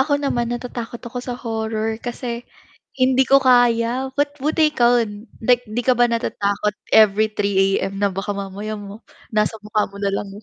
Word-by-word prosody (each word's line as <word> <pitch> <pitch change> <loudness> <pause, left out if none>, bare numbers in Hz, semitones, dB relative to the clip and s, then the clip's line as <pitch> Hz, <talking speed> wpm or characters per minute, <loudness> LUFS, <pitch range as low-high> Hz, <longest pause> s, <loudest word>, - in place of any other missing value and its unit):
ako 285 +2 -2
naman, 240 -4 -1
natatakot 240 -1 -5
ako 240 +2 -7
sa 245 -1 -5
horror 220 -1 -2
kasi, 240 -1 -5 0.6
hindi 260 +1 +3
ko 275 +1 +5
kaya. 245 +1 +3
Ba't 290 0 0
buti 310 +2 +2
ikaw, 245 -4 +3 0.4
'dik 245 +2 +3
'di 220 +2 -3
ka 255 - +5
ba 245 - +5
natatakot 210 -3 -1 0.2
every 215 0 +6
3:00 195 -2 +2
AM, 195 +1 -3
na 200 0 +1
baka 195 +2 -5
mamaya 200 +2 -5
mo 205 +1 -10 0.3
nasa 215 +1 +1
mukha 210 0 -1
mo 200 - -12
na 200 0 -1
lang. 200 0 -3
230 Hz, 175 wpm, -21 LUFS, 210-250 Hz, 0.6 s, every